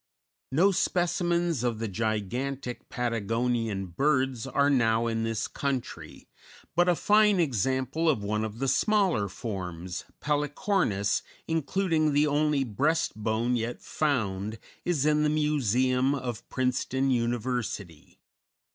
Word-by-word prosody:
No 175 Hz, +9 st, +4 dB
specimens 175 Hz, -5 st, +1 dB
of 120 Hz, -3 st, 0 dB
the 115 Hz, +1 st, -3 dB
gigantic 120 Hz, +5 st, -3 dB
Patagonian 115 Hz, -3 st, -1 dB
birds 130 Hz, -, 0 dB
are 140 Hz, +1 st, +2 dB
now 115 Hz, -4 st, +3 dB
in 115 Hz, -1 st, -1 dB
this 115 Hz, -1 st, -1 dB
country, 140 Hz, -3 st, -4 dB, 0.5 s
but 175 Hz, +1 st, +4 dB
a 175 Hz, -, +4 dB
fine 210 Hz, +1 st, +4 dB
example 130 Hz, -, +1 dB
of 115 Hz, -9 st, +1 dB
one 105 Hz, +1 st, -1 dB
of 110 Hz, 0 st, -5 dB
the 135 Hz, +3 st, -1 dB
smaller 175 Hz, -, +2 dB
forms, 90 Hz, -5 st, -5 dB
Pelycornis, 145 Hz, -, 0 dB, 0.3 s
including 160 Hz, 0 st, +1 dB
the 145 Hz, +1 st, +4 dB
only 150 Hz, -1 st, +2 dB
breast 145 Hz, +8 st, 0 dB
bone 110 Hz, +3 st, 0 dB
yet 120 Hz, +1 st, -3 dB
found, 110 Hz, -8 st, -1 dB, 0.3 s
is 160 Hz, -5 st, +1 dB
in 150 Hz, 0 st, +3 dB
the 150 Hz, -, +3 dB
Museum 130 Hz, -3 st, +2 dB
of 120 Hz, -4 st, -5 dB
Princeton 130 Hz, +1 st, 0 dB
University. 120 Hz, -8 st, -2 dB
130 Hz, 120 wpm, -28 LUFS, 115-150 Hz, 0.5 s, No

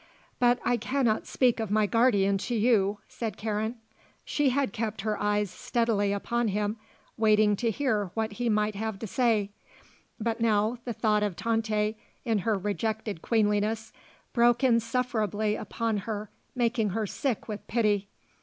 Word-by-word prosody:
"But 245 Hz, -1 st, +4 dB
I 245 Hz, -, +2 dB
cannot 235 Hz, -1 st, 0 dB
speak 245 Hz, -3 st, +2 dB
of 220 Hz, -2 st, -2 dB
my 215 Hz, +1 st, +3 dB
guardian 205 Hz, -4 st, +3 dB
to 240 Hz, -, -2 dB
you," 210 Hz, -3 st, +3 dB
said 225 Hz, -5 st, -5 dB
Karen. 220 Hz, +2 st, -2 dB, 0.5 s
She 290 Hz, -2 st, +1 dB
had 270 Hz, +1 st, 0 dB
kept 220 Hz, -3 st, -3 dB
her 215 Hz, 0 st, -2 dB
eyes 205 Hz, -2 st, +1 dB
steadily 225 Hz, -4 st, 0 dB
upon 235 Hz, +4 st, -1 dB
him 210 Hz, +1 st, -1 dB, 0.4 s
waiting 215 Hz, -1 st, +4 dB
to 235 Hz, +1 st, 0 dB
hear 220 Hz, -5 st, 0 dB
what 220 Hz, -1 st, -1 dB
he 235 Hz, +3 st, -2 dB
might 210 Hz, 0 st, +1 dB
have 220 Hz, 0 st, -3 dB
to 225 Hz, -, -6 dB
say, 215 Hz, -2 st, +1 dB, 0.7 s
but 230 Hz, +1 st, -2 dB
now 220 Hz, +1 st, +2 dB
the 240 Hz, -, -2 dB
thought 210 Hz, -1 st, +1 dB
of 205 Hz, -4 st, -1 dB
Tante 220 Hz, -1 st, 0 dB, 0.3 s
in 225 Hz, -3 st, +1 dB
her 215 Hz, +2 st, +1 dB
rejected 210 Hz, -1 st, -2 dB
queenliness 215 Hz, 0 st, 0 dB, 0.4 s
broke 240 Hz, +1 st, +4 dB
insufferably 230 Hz, -3 st, +1 dB
upon 225 Hz, +1 st, -2 dB
her 210 Hz, +1 st, -5 dB, 0.2 s
making 235 Hz, -3 st, +1 dB
her 220 Hz, -, 0 dB
sick 250 Hz, +3 st, -2 dB
with 210 Hz, -2 st, -6 dB
pity. 210 Hz, -4 st, +1 dB
220 Hz, 155 wpm, -28 LUFS, 210-235 Hz, 0.7 s, But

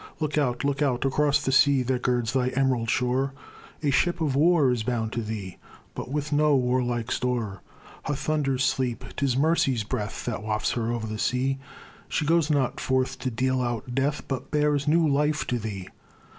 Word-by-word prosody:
Look 155 Hz, -2 st, -1 dB
out! 125 Hz, -4 st, 0 dB
look 140 Hz, 0 st, 0 dB
out! 135 Hz, -3 st, +1 dB
across 145 Hz, +1 st, +2 dB
the 135 Hz, -, +1 dB
sea 140 Hz, -1 st, +5 dB
That 125 Hz, 0 st, -1 dB
girds 120 Hz, -1 st, 0 dB
thy 130 Hz, -1 st, +1 dB
em'rald 130 Hz, -4 st, +1 dB
shore, 130 Hz, +3 st, +1 dB, 0.5 s
A 145 Hz, -, +2 dB
ship 175 Hz, +7 st, +2 dB
of 150 Hz, -5 st, 0 dB
war 155 Hz, -2 st, +4 dB
is 120 Hz, -2 st, 0 dB
bound 110 Hz, -1 st, -2 dB
to 120 Hz, -, -1 dB
thee, 105 Hz, -4 st, -6 dB, 0.4 s
But -, -, -6 dB
with 150 Hz, +1 st, -2 dB
no 150 Hz, 0 st, +4 dB
war 125 Hz, 0 st, +2 dB
like 120 Hz, -1 st, -2 dB
store. 120 Hz, -6 st, -2 dB, 0.4 s
Her 145 Hz, -, -1 dB
thunders 140 Hz, -3 st, 0 dB
sleep; 130 Hz, -2 st, 0 dB
'tis 135 Hz, -3 st, 0 dB
mercy's 150 Hz, -5 st, +2 dB
breath 105 Hz, -1 st, -4 dB
That 120 Hz, -4 st, -3 dB
wafts 105 Hz, 0 st, -1 dB
her 115 Hz, -1 st, -1 dB
o'er 120 Hz, -1 st, -2 dB
the 110 Hz, -1 st, -5 dB
sea; 135 Hz, +3 st, 0 dB, 0.5 s
She 150 Hz, -, 0 dB
goes 165 Hz, 0 st, +3 dB
not 140 Hz, -5 st, +1 dB
forth 130 Hz, 0 st, 0 dB
to 130 Hz, -, -2 dB
deal 130 Hz, +2 st, 0 dB
out 120 Hz, 0 st, -3 dB
death, 140 Hz, +3 st, 0 dB
But 130 Hz, -3 st, -4 dB
bears 150 Hz, -1 st, +1 dB
new 165 Hz, +1 st, +4 dB
life 150 Hz, +1 st, +1 dB
to 125 Hz, -, -1 dB
thee. 100 Hz, -4 st, -5 dB
130 Hz, 190 wpm, -26 LUFS, 120-145 Hz, 0.5 s, sea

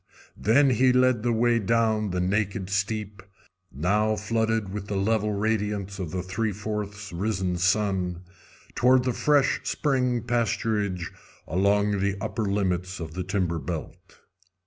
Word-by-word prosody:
Then 135 Hz, +6 st, +4 dB
he 125 Hz, +2 st, +4 dB
led 125 Hz, -2 st, +3 dB
the 120 Hz, +1 st, +1 dB
way 120 Hz, +1 st, +3 dB
down 110 Hz, 0 st, +1 dB
the 90 Hz, 0 st, -2 dB
naked 100 Hz, +1 st, -1 dB
steep, 100 Hz, 0 st, -2 dB, 0.5 s
now 105 Hz, +9 st, +1 dB
flooded 110 Hz, -1 st, 0 dB
with 100 Hz, -1 st, -5 dB
the 100 Hz, -, -2 dB
level 105 Hz, +1 st, +1 dB
radiance 105 Hz, -2 st, -1 dB
of 90 Hz, -4 st, -3 dB
the 90 Hz, +2 st, -3 dB
three 105 Hz, +4 st, -2 dB
fourths 105 Hz, 0 st, -5 dB
risen 95 Hz, -1 st, -1 dB
sun, 90 Hz, -1 st, 0 dB, 0.5 s
toward 125 Hz, +1 st, +4 dB
the 125 Hz, -1 st, 0 dB
fresh 145 Hz, 0 st, +2 dB
spring 125 Hz, -5 st, 0 dB
pasturage 110 Hz, -6 st, -1 dB, 0.4 s
along 100 Hz, +3 st, +2 dB
the 100 Hz, 0 st, 0 dB
upper 110 Hz, +1 st, -2 dB
limits 95 Hz, -2 st, -1 dB
of 80 Hz, -2 st, -6 dB
the 90 Hz, +1 st, -3 dB
timber 90 Hz, -3 st, -1 dB
belt. 80 Hz, +2 st, -5 dB
105 Hz, 140 wpm, -26 LUFS, 95-115 Hz, 0.5 s, Then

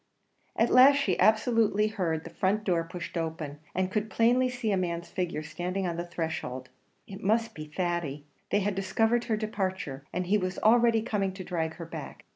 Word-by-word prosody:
At 230 Hz, -, +2 dB
last 265 Hz, +3 st, +8 dB
she 280 Hz, -, 0 dB
absolutely 220 Hz, -1 st, +3 dB
heard 170 Hz, -7 st, -2 dB
the -, -, -9 dB
front 205 Hz, +3 st, 0 dB
door 175 Hz, -5 st, +1 dB
pushed 170 Hz, +2 st, -7 dB
open, 160 Hz, -3 st, -4 dB, 0.2 s
and 185 Hz, 0 st, 0 dB
could 215 Hz, +1 st, -1 dB
plainly 245 Hz, +3 st, +3 dB
see 245 Hz, -3 st, -2 dB
a -, -, +3 dB
man's 170 Hz, -2 st, -2 dB
figure 170 Hz, -4 st, -3 dB
standing 180 Hz, +4 st, -3 dB
on 170 Hz, -2 st, -2 dB
the 175 Hz, +1 st, -4 dB
threshold. 160 Hz, -7 st, -4 dB, 0.4 s
It 195 Hz, +1 st, -9 dB
must 225 Hz, +3 st, +1 dB
be 155 Hz, -, -7 dB
Thady! 155 Hz, -3 st, -3 dB, 0.2 s
They 205 Hz, -, +2 dB
had 205 Hz, +1 st, 0 dB
discovered 225 Hz, +5 st, +1 dB
her 220 Hz, -, 0 dB
departure, 190 Hz, -10 st, -3 dB
and 180 Hz, +1 st, -2 dB
he 205 Hz, +4 st, +2 dB
was 185 Hz, -1 st, -3 dB
already 230 Hz, 0 st, +4 dB
coming 195 Hz, -4 st, -1 dB
to 190 Hz, 0 st, -7 dB
drag 165 Hz, -3 st, -2 dB
her 170 Hz, -, -7 dB
back! 165 Hz, -, -8 dB
190 Hz, 190 wpm, -28 LUFS, 170-220 Hz, 0.4 s, last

